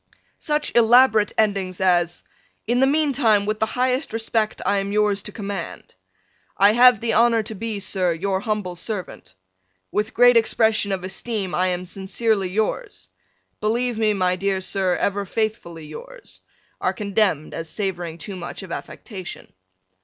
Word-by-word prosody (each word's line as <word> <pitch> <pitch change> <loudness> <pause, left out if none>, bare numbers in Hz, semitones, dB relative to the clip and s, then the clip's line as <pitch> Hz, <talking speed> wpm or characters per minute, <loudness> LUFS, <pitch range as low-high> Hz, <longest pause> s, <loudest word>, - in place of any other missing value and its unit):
Such 300 -1 -1
elaborate 235 -2 +5
endings 195 -4 0
as 175 -2 +1 0.4
"In 240 +2 +1
the 265 - +4
meantime 270 -8 +2
with 215 +1 -2
the 220 - +1
highest 255 +2 0
respect, 225 -1 -1
I 200 +1 +2
am 195 0 -3
yours 210 -1 +1
to 210 - -5
command," 200 -2 -6 0.6
"I 200 +2 +6
have 245 -1 +6
the 230 +1 -1
honor 230 0 +4
to 215 - -6
be, 220 0 -4
Sir, 185 -2 0
Your 190 +3 -1
humble 205 -4 -3
Servant," 180 - -6 0.6
"With 210 +1 -2
great 245 0 +6
expression 220 -2 +2
of 190 -2 -2
esteem, 195 0 -4
I 185 +1 +1
am 180 0 -2
Sincerely 195 +1 -1
yours," 220 - -3 0.5
"Believe 235 +2 0
me, 215 -1 +2
my 185 -1 +1
dear 195 0 0
Sir, 190 -1 0
Ever 200 0 -1
faithfully 190 -6 -3
yours," 155 - -11 0.4
are - - +1
condemned 200 -7 0
as 165 -1 -5
savoring 175 -5 -4
too 195 +3 -7
much 180 +2 -7
of 185 - -10
affectation. 185 +1 -8
205 Hz, 155 wpm, -22 LUFS, 185-225 Hz, 0.6 s, I